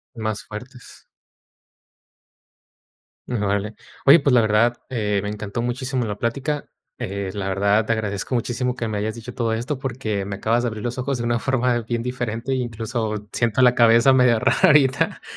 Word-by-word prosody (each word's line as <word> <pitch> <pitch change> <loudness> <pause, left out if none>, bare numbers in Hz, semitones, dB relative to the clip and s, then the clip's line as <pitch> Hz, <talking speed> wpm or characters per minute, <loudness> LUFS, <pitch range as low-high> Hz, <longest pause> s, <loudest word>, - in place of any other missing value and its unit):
Más 110 -2 -3
fuertes. 125 +4 -11 2.2
Órale. 105 -2 -1 0.3
Oye, 145 +4 +8
pues, 140 - +2
la 120 - +6
verdad, 110 +3 +2
eh 105 -5 0
me 105 - -3
encantó 105 +2 -4
muchísimo 125 0 -2
la 105 -1 -4
plática. 140 +5 -2 0.3
Eh, 100 -1 -4
la 100 -2 -3
verdad, 100 +3 +2
te 115 - -1
agradezco 105 +2 -3
muchísimo 120 +1 -1
que 115 -3 -3
me 105 -1 -2
hayas 110 +1 -2
dicho 120 +1 -9
todo 115 -2 -1
esto, 125 +4 -3
porque 115 -7 -3
me 100 0 -4
acabas 115 +4 +1
de 120 - 0
abrir 110 -2 -5
los 120 +2 -3
ojos 130 0 -1
de 120 - -4
una 120 0 0
forma 125 -2 +1
bien 115 +1 -3
diferente, 125 0 -3
incluso 115 -3 -3
siento 115 +1 +1
la 125 0 +6
cabeza 115 +2 +5
medio 125 -3 +4
rarita. 135 +2 +3
115 Hz, 170 wpm, -22 LUFS, 105-125 Hz, 2.2 s, Oye